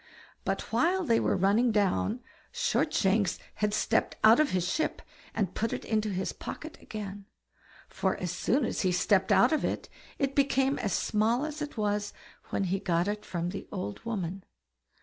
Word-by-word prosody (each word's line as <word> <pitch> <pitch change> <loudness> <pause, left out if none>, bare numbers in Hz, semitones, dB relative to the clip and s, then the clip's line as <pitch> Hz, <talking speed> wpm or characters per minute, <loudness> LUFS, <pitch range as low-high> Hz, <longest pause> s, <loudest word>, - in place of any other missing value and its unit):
But - - -1
while 370 +2 +3
they 230 -7 +3
were - - +1
running 205 +6 +3
down, 210 +3 +1 0.3
Shortshanks 210 - +1 0.2
had 210 0 +2
stepped 220 +2 +1
out 220 +4 +8
of 305 - +4
his 180 -1 0
ship 315 - -1 0.3
and 195 -5 0
put 225 +1 -1
it - - -4
into 215 -1 0
his 190 -1 -2
pocket 315 0 -8
again; 205 -2 -7 0.6
for 190 - -1
as 180 -2 -3
soon 245 +9 +1
as - - -2
he 185 - +2
stepped 190 +2 +2
out 245 +5 +5
of 310 - +1
it, - - -2 0.3
it 275 -2 0
became 275 -1 +2
as 200 - -1
small 225 - +1
as 305 -1 -6
it 295 -4 -5
was 210 -1 -1 0.4
when - - 0
he 190 +1 0
got 175 -2 +1
it 210 0 -2
from 175 -3 -3
the 195 - -6
old 140 - -5
woman. 195 -5 -3
210 Hz, 175 wpm, -29 LUFS, 190-245 Hz, 0.6 s, out